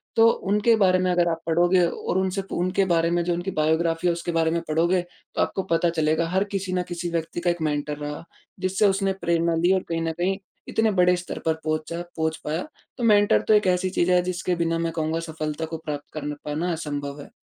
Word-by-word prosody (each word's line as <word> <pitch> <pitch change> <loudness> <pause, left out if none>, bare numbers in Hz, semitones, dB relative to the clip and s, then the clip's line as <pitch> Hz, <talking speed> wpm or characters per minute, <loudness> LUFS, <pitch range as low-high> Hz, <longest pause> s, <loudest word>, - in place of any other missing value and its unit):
तो 225 0 +6 0.2
उनके 210 +3 +4
बारे 185 -3 +4
में 185 0 +1
अगर 175 -1 +2
आप 165 0 -2
पढ़ोगे 175 +2 +4
और 180 - -2
उनसे 190 +1 -1
उनके 185 +2 +1
बारे 165 0 +2
में 175 0 +1
जो 175 0 0
उनकी 175 +3 -3
बायोग्राफ़ी 165 +2 +1
और - - +2
उसके 170 0 -4
बारे 165 -1 +2
में 170 0 0
पढ़ोगे, 170 +4 +2
तो 175 - -7
आपको 190 - 0
पता 170 +1 +3
चलेगा 160 0 +1
हर 190 +2 +2
किसी 185 -1 -2
न 180 -1 +1
किसी 175 0 -3
व्यक्ति 165 0 -2
का 175 - +1
एक 170 -1 -1
मेंटर 150 -1 -1
रहा 150 +1 -5 0.4
जिससे 190 +2 +2
उसने 195 0 +1
प्रेरणा 170 -1 +1
ली 180 +2 +5
और 190 - +1
कहीं 165 0 -1
न 165 0 -1
कहीं 190 +2 0 0.3
इतने 220 -1 +2
बड़े 180 -1 +4
स्तर 175 - -6
पर 160 - +3
पहुँचा 155 +2 -2 0.2
पहुँच 160 0 0
पाया। 155 +3 -1 0.3
तो 240 - -4
मैं 215 -2 +6
मेंटर 205 0 +4
तो 215 - +5
एक 210 -2 +4
ऐसी 180 +1 +2
चीज़ 180 -1 +1
है 180 0 +5
जिसके 180 0 -1
बिना 165 0 0
मैं 165 0 -1
कहूँगा 160 0 -1
सफलता 155 0 -3
को 160 0 -5
प्राप्त 145 -1 -5
कर 150 -1 -4
पाना 160 +4 -1
असंभव 145 -2 -4
है। - - -12
170 Hz, 230 wpm, -24 LUFS, 160-185 Hz, 0.4 s, तो